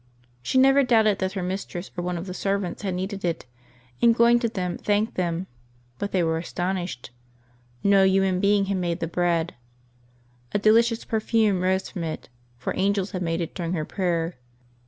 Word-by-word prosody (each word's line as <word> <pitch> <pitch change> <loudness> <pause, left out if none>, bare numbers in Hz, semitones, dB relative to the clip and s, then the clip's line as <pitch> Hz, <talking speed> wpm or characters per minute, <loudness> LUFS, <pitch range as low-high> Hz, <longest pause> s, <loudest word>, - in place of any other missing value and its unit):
She 190 - -1
never 270 +2 +6
doubted 220 -5 +3
that 190 0 -1
her 190 -2 -3
mistress 185 0 -4
or 175 - -3
one 180 0 -2
of 170 - -5
her 185 - -6
servants 195 -1 -2
had 190 -3 -2
kneaded 195 +2 -4
it, 170 -6 -2 0.6
and 230 -1 +5
going 235 +1 +5
to 235 -1 0
them, 180 -4 -3
thanked 210 +2 +1
them; 175 0 -1 0.5
but 205 - -3
they 185 -2 +2
were 160 0 0
astonished. 175 -7 -4 0.7
ISTo 200 -1 +5
human 190 -1 +2
being 200 0 +3
had 195 0 -1
made 175 -1 -1
the 165 - -1
bread. 170 0 0 1.0
A - - +3
delicious 225 +2 +3
perfume 220 -3 +1
rose 190 +1 +1
from 175 - -4
it, 160 -5 -5 0.3
for 120 - -3
angels 200 0 0
had 185 - -4
made 165 0 -1
it 165 - -4
during 170 -1 -3
her 155 -4 -2
prayer. 170 -3 -1
190 Hz, 180 wpm, -25 LUFS, 175-205 Hz, 1.0 s, never